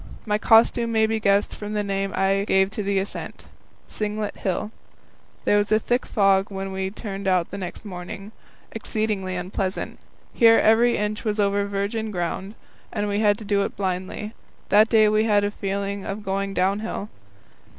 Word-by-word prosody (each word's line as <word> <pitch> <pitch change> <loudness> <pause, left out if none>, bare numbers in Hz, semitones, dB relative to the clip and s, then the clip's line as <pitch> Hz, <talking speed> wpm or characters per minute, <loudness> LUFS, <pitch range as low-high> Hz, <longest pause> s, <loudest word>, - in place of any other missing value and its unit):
My 210 -1 0
costume 230 +1 +4
may 220 -1 +3
be 220 0 0
guessed 200 -1 +2
from 210 0 -6
the 210 -1 0
name 195 -1 -2
I 195 +1 +2
gave 190 0 +3
to 215 - -3
the 200 -1 0
ascent 195 +1 -5 0.4
Singlet 210 0 -3
Hill. 195 +3 -2 0.7
There 205 - +4
was 205 +1 -1
a 215 - +6
thick 245 +3 -1
fog 195 -2 +3
when 195 -1 -5
we 190 0 -2
turned 200 -1 -6
out 180 -2 +1
next 195 +1 -6
morning, 195 +2 -7 0.4
exceedingly 215 -4 -2
unpleasant. 185 +1 -3 0.3
Here 225 -1 +6
every 235 +2 +4
inch 210 +1 -2
was 215 -1 -1
over 200 0 +2
virgin 200 +2 -2
ground, 190 +2 -3 0.4
and 210 -2 -2
we 205 0 0
had 205 -2 +3
to 215 - -9
do 200 0 +2
it - - -3
blindly. 190 +3 -3 0.4
That 210 +3 +5
day 220 -2 +5
we 215 +1 +3
had 205 -2 +3
a 205 - 0
feeling 200 0 -3
of 205 +2 -5
going 195 0 -2
downhill. 200 +3 -1
205 Hz, 170 wpm, -24 LUFS, 195-215 Hz, 0.7 s, a